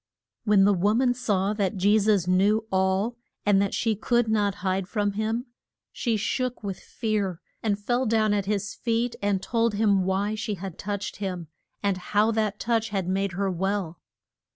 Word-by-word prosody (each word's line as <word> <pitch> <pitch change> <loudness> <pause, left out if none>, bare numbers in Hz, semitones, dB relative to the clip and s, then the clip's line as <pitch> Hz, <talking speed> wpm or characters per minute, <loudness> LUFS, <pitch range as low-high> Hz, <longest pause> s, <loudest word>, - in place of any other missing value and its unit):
When 205 -2 +5
the 205 +1 +5
wo 200 +4 +2
man 245 0 +3
saw 205 -5 0
that 205 -1 -1
Je 205 +3 +4
sus 205 -4 +2
knew 200 +5 +3
all, 190 +5 +1 0.3
and 200 -1 +4
that 200 - 0
she 225 -2 +1
could 235 +2 +1
not 205 -2 +1
hide 190 0 0
from 205 0 0
him, 220 +4 -2 0.5
she 230 -3 -1
shook 250 +3 -2
with 195 -2 -4
fear, 205 -6 -2 0.2
and 210 -3 0
fell 240 +5 0
down 215 -1 +2
at 200 -2 -1
his 200 -1 -1
feet, 235 +1 -1
and 200 -2 0
told 230 -2 +1
him 200 -3 +3
why 195 +3 0
she 215 -1 -3
had 190 -2 -8
touched 200 0 -4
him, 180 -5 -4 0.3
and 200 -2 +1
how 210 +4 +1
that 215 -2 -1
touch 225 -1 0
had 195 -4 -2
made 190 0 0
her 195 +1 -1
well. 185 -2 -2
205 Hz, 180 wpm, -26 LUFS, 195-220 Hz, 0.5 s, When